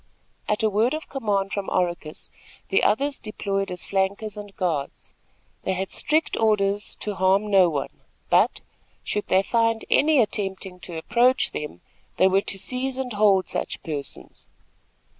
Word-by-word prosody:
At 210 +1 0
a 220 - +4
word 225 +8 +2
of 315 - -7
command 205 -7 -1
from 200 -1 -2
Oracus 175 -4 -2 0.4
the 195 - +3
others 275 +7 +1
deployed 195 -2 -3
as 180 - -7
flankers 200 +2 -1
and 205 -1 -9
guards. 160 -7 -3 0.5
They 190 - -1
had 190 +1 -3
strict 310 +2 +1
orders 205 -2 +1
to 210 - -2
harm 195 +2 +2
no 190 -3 +6
one; 145 -4 -4 0.3
but, - - +3 0.4
should 210 - -2
they 190 +1 +3
find 230 +1 +1
any 300 -1 +5
attempting 195 -4 -2
to 175 -2 -7
approach 240 +9 +2
them, 150 - -6 0.4
they 190 - +5
were 190 +1 +3
to 200 - -3
seize 255 +5 -3
and 255 -3 -3
hold 205 -2 +4
such - - -4
persons. 145 -3 -7
200 Hz, 155 wpm, -24 LUFS, 190-225 Hz, 0.5 s, no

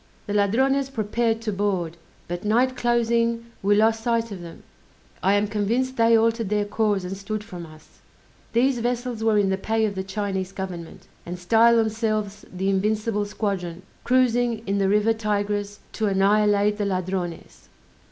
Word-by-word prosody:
The 205 - -4
Ladrones 265 +7 +2
prepared 225 -1 -1
to 220 -2 -2
board; 190 -4 -1 0.3
but 175 +1 -5
night 245 +5 +2
closing 235 -1 +1 0.2
we 205 +1 +3
lost 220 +1 +3
sight 230 -1 0
of 190 -3 -7
them: 170 -1 -11 0.6
I 195 - +3
am 205 +1 +3
convinced 225 +5 -1
they 230 -1 +5
altered 225 -2 +1
their 210 0 +1
course 205 -2 0
and 180 +2 -4
stood 210 +2 -5
from 180 -6 -9
us. 155 0 -18 0.5
These 245 +2 +2
vessels 240 -1 -2
were 220 -1 +3
in 200 -2 +2
the 190 - -1
pay 220 +2 +1
of 210 - -2
the 190 -1 -3
Chinese 195 -1 -3
government, 180 -4 -7 0.2
and 175 +1 -6
style 225 +6 +4
themselves 215 -2 -1
the 185 +1 -3
Invincible 210 +2 0
Squadron, 190 -4 -3 0.2
cruising 245 -2 +2
in 200 +1 0
the 195 -1 +2
river 210 +2 +3
Tigris 205 -1 -2
to 220 - -1
annihilate 205 +1 +3
the 205 - 0
Ladrones! 185 -2 -4
210 Hz, 160 wpm, -24 LUFS, 195-230 Hz, 0.6 s, they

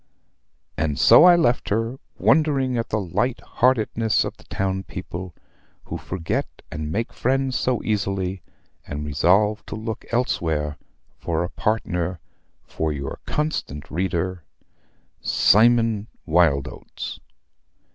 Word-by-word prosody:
And 75 -3 0
so 160 - +8
I 180 -1 +9
left 125 -8 +1
her, 115 +5 -1 0.2
wondering 140 -5 +3
at 115 -1 -2
the 110 - 0
light 100 +7 -1
heartedness 115 -3 +2
of - - -5
the - - -20
town 95 0 -2
people, 90 -2 -7 0.5
who - - -6
forget 85 -3 -2 0.2
and 75 -2 -4
make 115 +7 -2
friends 130 +1 0
so 125 +1 0
easily, 95 -3 -1 0.5
and 75 +1 -4
resolved 95 +9 +2
to - - -5
look 110 +1 -5
elsewhere 80 - 0 0.4
for 85 0 -1
a 90 - -3
partner 90 -5 -1 0.4
for 80 -1 -2
your 70 -2 -5
constant 75 - -3
reader, 90 +1 -1 0.8
"CYMON 115 -1 +4 0.2
WYLDOATS." 80 -5 0
100 Hz, 115 wpm, -23 LUFS, 85-115 Hz, 0.8 s, I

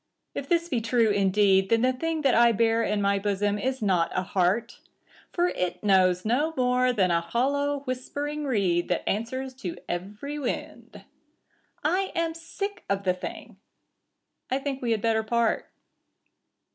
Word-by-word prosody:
If 275 - -5
this 340 -1 +2
be 250 -8 -1
true 230 -1 +2
indeed, 195 -1 +3
Then 230 +1 +3
the 255 0 +3
thing 320 +4 -2
that 270 - +4
I 235 0 +5
bear 225 +1 +2
in 210 -2 0
my 200 0 +2
bosom 205 +1 0
is 260 0 -2
not 175 -4 +2
a 185 - +1
heart, 195 +5 0 0.5
For 355 0 +1
it 180 - -3
knows 185 -2 +3
no 290 +9 +1
more 250 0 +3
than 190 -7 +2
a 170 0 +2
hollow, 280 +9 0
whispering 285 +3 -4
reed 190 -9 +1
That 175 - -2
answers 260 +5 -2
to 180 -9 -5
every 205 +12 -5
wind. 265 - -5 0.8
I 380 +1 +1
am 335 -1 0
sick 375 +4 -6
of 200 0 0
the 185 -1 +2
thing. 180 - -8 0.9
I 260 - +1
think 270 -1 -4
we 240 - -2
had 220 -2 0
better 225 -1 +2
part. 230 +1 0
230 Hz, 160 wpm, -26 LUFS, 200-270 Hz, 0.9 s, I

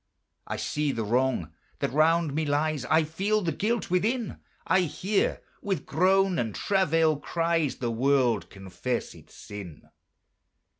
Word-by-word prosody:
I - - -3
see 150 -1 -1
the 115 -4 -2
wrong 120 - 0 0.2
that - - -2
round 160 0 +3
me 160 +2 0
lies, 145 -2 0
I 160 +4 +3
feel 195 +7 0
the 165 - 0
guilt 215 +4 -1
within; 220 +5 0 0.3
I 185 - +3
hear, 180 +4 0 0.2
with 190 -7 -2
groan 190 +3 +3
and 110 -4 -2
travail 165 -5 +2
cries, 165 -1 0
The 120 -2 -2
world 120 -6 +2
confess 95 +5 -4
its - - -17
sin. 100 -7 -10
155 Hz, 140 wpm, -27 LUFS, 125-180 Hz, 0.3 s, round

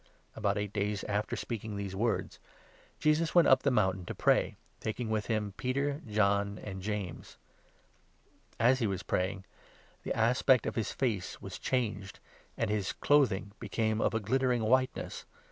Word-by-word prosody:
The - - -10
About 100 -1 +1
eight 105 0 -3
days 105 -1 -1
after 105 0 -1
speaking 110 -2 -5
these 100 -1 -4
words, 115 +2 -1
Transfigure - - -29
Jesus 155 +2 +2
went 170 -3 +7
up 130 0 +6
the 140 - +2
mountain 95 -7 +1
to - - -5
pray, - - +2 0.2
taking 110 +1 -3
with 110 -1 0
tson. 110 -3 -1
iiml - - -38
Peter, 140 +3 -1
John, 100 -1 +1
and 95 -2 -7
James. 100 -4 -5 1.2
As 125 +3 +4
he 115 - +1
was 95 -2 -3
pray 90 +1 0
ing, 95 -1 -9 0.6
the - - -3
aspect 125 +2 +4
of - - -1
his 115 - -2
face 110 -9 -2
was 95 -2 -8
changed, 110 -7 -2 0.4
and - - 0
his 105 -2 -1
clothing 115 -9 +2
became 110 -1 -1
of - - +1
a - - +2
glittering 125 +2 +1
whiteness. 130 +3 0
110 Hz, 170 wpm, -31 LUFS, 100-125 Hz, 1.2 s, went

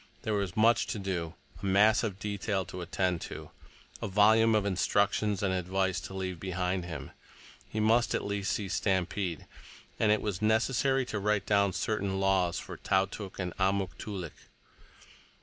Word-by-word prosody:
There 110 - -1
was 100 -3 -2
much 115 +2 +4
to 115 - -3
do, 90 -4 -3 0.3
a - - -5
mass 105 +3 +5
of 100 -4 -2
detail 100 -1 -2
to 90 +2 -7
attend 90 0 -1
to, - - -8 0.5
a - - -2
volume 110 +3 +5
of 105 -2 +2
instructions 100 +1 +1
and 95 -2 +1
advice 95 +1 0
to 95 - -8
leave 95 -2 -4
behind 90 -1 -2
him. 80 -5 -7 0.6
He 110 - -3
must 115 +1 +3
at - - -2
least 100 -1 -1
see 105 - -2
Stampede, 95 -2 -1 0.5
and 110 -1 +4
it 105 - +3
was 105 -3 -2
necessary 130 +4 +2
to 110 - -3
write 105 0 +1
down 100 -2 +3
certain 95 +1 -1
laws 95 -3 +2
for - - -7
Tautuk 95 +1 -1
and 90 -2 -4
Amuk 95 -1 +1
Toolik. 95 -6 -7
100 Hz, 165 wpm, -30 LUFS, 95-105 Hz, 0.6 s, mass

